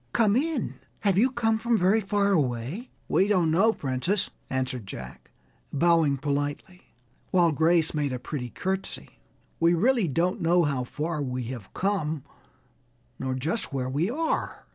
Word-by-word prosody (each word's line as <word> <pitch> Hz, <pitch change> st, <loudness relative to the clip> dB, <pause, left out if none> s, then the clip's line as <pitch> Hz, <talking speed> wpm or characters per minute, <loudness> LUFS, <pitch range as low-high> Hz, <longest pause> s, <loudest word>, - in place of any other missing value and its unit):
"Come 215 Hz, -2 st, +3 dB
in. 300 Hz, +1 st, -1 dB, 0.2 s
Have 200 Hz, -2 st, +3 dB
you 250 Hz, +4 st, +4 dB
come 225 Hz, -3 st, +1 dB
from 235 Hz, 0 st, +2 dB
very 195 Hz, +4 st, +3 dB
far 200 Hz, 0 st, +1 dB
away?" 140 Hz, -, -1 dB, 0.2 s
"We 190 Hz, -, +3 dB
don't 180 Hz, -6 st, +3 dB
know, 195 Hz, +8 st, +4 dB
Princess," 140 Hz, -, -1 dB, 0.2 s
answered 130 Hz, -4 st, -2 dB
Jack, 65 Hz, -9 st, -9 dB, 0.4 s
bowing 160 Hz, -2 st, +3 dB
politely, 145 Hz, +4 st, -4 dB, 0.3 s
while 175 Hz, -3 st, +4 dB
Grace 160 Hz, +2 st, +3 dB
made 145 Hz, -3 st, 0 dB
a 130 Hz, -, -2 dB
pretty 125 Hz, 0 st, -5 dB
courtesy; 190 Hz, +8 st, -4 dB, 0.4 s
"we 170 Hz, +1 st, +4 dB
really 230 Hz, +2 st, +3 dB
don't 170 Hz, +5 st, 0 dB
know 170 Hz, +1 st, +4 dB
how 140 Hz, -5 st, 0 dB
far 150 Hz, +4 st, -3 dB
we 130 Hz, -2 st, -2 dB
have 115 Hz, -7 st, -10 dB
come, 160 Hz, -7 st, -1 dB, 1.0 s
nor 130 Hz, -1 st, -2 dB
just 160 Hz, -, -2 dB
where 130 Hz, -1 st, -2 dB
we 155 Hz, +8 st, 0 dB
are." 320 Hz, +6 st, -2 dB
165 Hz, 150 wpm, -27 LUFS, 135-200 Hz, 1.0 s, you